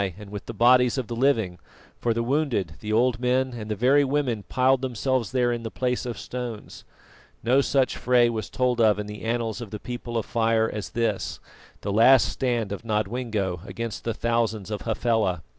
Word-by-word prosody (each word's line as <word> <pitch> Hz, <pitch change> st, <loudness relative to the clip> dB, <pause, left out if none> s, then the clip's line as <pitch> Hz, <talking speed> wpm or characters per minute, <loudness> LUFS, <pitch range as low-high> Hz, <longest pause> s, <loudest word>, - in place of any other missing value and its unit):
and 105 Hz, -1 st, -11 dB
with 105 Hz, -1 st, -7 dB
the -, -, -4 dB
bodies 125 Hz, +3 st, +4 dB
of 130 Hz, -, -1 dB
the 115 Hz, -, -5 dB
living, 115 Hz, -9 st, +1 dB, 0.4 s
for 120 Hz, -, 0 dB
the 115 Hz, +1 st, 0 dB
wounded, 120 Hz, -, 0 dB
the 105 Hz, -, -5 dB
old 120 Hz, +2 st, +2 dB
men 130 Hz, +1 st, +1 dB
and 110 Hz, -3 st, -7 dB
the 105 Hz, -, -1 dB
very 135 Hz, +6 st, +4 dB
women 135 Hz, -5 st, 0 dB
piled 130 Hz, +1 st, +3 dB
themselves 130 Hz, -2 st, -1 dB
there 125 Hz, -1 st, +2 dB
in 120 Hz, -1 st, -2 dB
the 115 Hz, -, -5 dB
place 125 Hz, +1 st, -2 dB
of 120 Hz, -, -4 dB
stones. 120 Hz, -4 st, -7 dB, 0.6 s
No 125 Hz, +5 st, +4 dB
such 135 Hz, -1 st, +1 dB
fray 125 Hz, -1 st, +3 dB
was 115 Hz, -2 st, -3 dB
told 125 Hz, -2 st, +1 dB
of 105 Hz, -3 st, +4 dB
in 105 Hz, -, -3 dB
the 105 Hz, 0 st, -8 dB
annals 115 Hz, 0 st, -2 dB
of 115 Hz, -, -7 dB
the 105 Hz, -, -6 dB
People 120 Hz, 0 st, -5 dB
of 115 Hz, -, -1 dB
Fire 115 Hz, -1 st, +2 dB
as 105 Hz, -4 st, -5 dB
this, 115 Hz, 0 st, -2 dB, 0.4 s
the 100 Hz, -, -3 dB
last 120 Hz, +3 st, +6 dB
stand 120 Hz, -5 st, -1 dB
of 100 Hz, -, -5 dB
Nodwengo 105 Hz, -3 st, -1 dB
against 115 Hz, +1 st, -5 dB
the 115 Hz, -2 st, -2 dB
thousands 115 Hz, -3 st, -1 dB
of 105 Hz, -, -3 dB
Hafela. 110 Hz, -6 st, 0 dB
115 Hz, 195 wpm, -25 LUFS, 110-125 Hz, 0.6 s, last